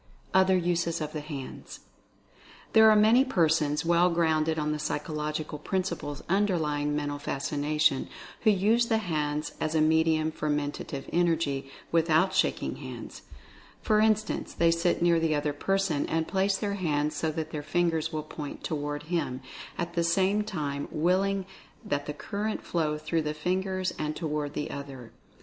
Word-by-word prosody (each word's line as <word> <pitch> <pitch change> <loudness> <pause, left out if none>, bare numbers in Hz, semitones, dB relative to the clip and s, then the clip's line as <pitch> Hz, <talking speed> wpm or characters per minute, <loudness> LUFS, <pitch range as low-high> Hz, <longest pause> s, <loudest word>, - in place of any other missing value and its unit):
OTHER 190 0 +5
USES 170 -1 0
OF 155 -1 -4
THE 155 - -3
HANDS. 145 -3 -8 0.9
There 220 0 +8
are 215 - +6
many 220 +5 +6
persons, 160 - +1
well 170 +1 +4
grounded 160 -2 +1
on 150 0 0
the 150 - -2
psychological 150 0 -3
principles 170 -4 -3
underlying 160 -7 +1
Mental 145 -1 -2
Fascina 145 +2 -2
tion, 140 -3 +3 0.3
who 220 - +4
use 215 +4 +3
the 225 - +2
hands 150 -6 -2
as 155 +1 -1
a - - +4
medium 160 0 +3
for 155 -1 -3
Mentative 145 -1 -3
Energy, 160 -6 +1 0.2
without 165 +3 +3
shaking - - 0
hands. - - -8 0.6
For 215 -1 +3
instance, 215 0 +1
they 170 0 +4
sit 170 +1 +1
near 170 -1 +4
the 160 -1 +1
other 145 0 -1
person 180 -1 0
and 160 0 0
place 195 0 +1
their 205 -1 -2
hands 150 -5 0
so 160 +2 0
that 160 0 -4
their 150 - -3
fingers 165 0 0
will 155 -2 -3
point 150 -1 -7
toward 145 -2 -3
him, 155 -6 -2 0.4
at 170 0 -3
the 170 -1 +1
same 190 +5 +2
time 145 -9 -3
willing 190 +4 +1 0.4
that 145 0 -2
the 150 - -3
current 210 +7 -3
flow 155 -3 -1
through 155 +2 -1
the 150 0 -3
fingers 185 +3 -1
and 150 0 -2
toward 150 -3 -3
the 150 - -3
other. 135 -4 -8
160 Hz, 160 wpm, -28 LUFS, 150-185 Hz, 0.9 s, There